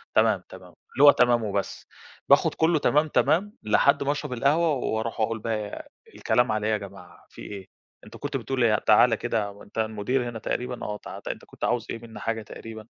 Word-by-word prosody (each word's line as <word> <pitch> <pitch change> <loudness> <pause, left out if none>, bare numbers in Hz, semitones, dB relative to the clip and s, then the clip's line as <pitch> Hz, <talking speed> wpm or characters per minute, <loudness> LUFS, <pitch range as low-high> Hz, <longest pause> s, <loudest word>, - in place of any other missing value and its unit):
تمام، - - +3
تمام، - - -12 0.3
اللي 140 - +2
هو 145 - +11
تمام 120 -2 +3
وبس، 100 -1 -3 0.4
باخد - - +5
كلّه 160 -1 +2
تمام، 150 +3 +2
تمام، 200 +7 +1
لحد 125 +7 +3
ما 140 - +1
اشرب 145 -3 -4
القهوة 150 +7 +2
واروح 115 -3 -2
وأقول 110 +1 0
بَقى 105 -2 -5 0.2
الكلام 120 -2 +1
على 110 0 -1
إيه 110 - +1
يا - - +2
جماعة، 95 -3 -12
في - - -13
إيه؟ 100 -2 -8 0.4
أنت - - -12
كنت - - -3
بتقول 130 -2 -2
إيه؟ 110 -2 +4
تعالَ 110 +3 +4
كده، 105 -4 -3
أنت 100 - -16
المدير 110 +3 -1
هنا 115 - -7
تقريبًا؟ 125 +2 -4
آه، 105 0 -4
تعا - - -10
أنت - - -5
كنت - - -13
عاوز 120 -2 0
إيه 115 - -4
مني 115 -2 -11
حاجة 115 +1 -2
تقريبًا، 110 +1 -10
115 Hz, 200 wpm, -25 LUFS, 105-125 Hz, 0.4 s, هو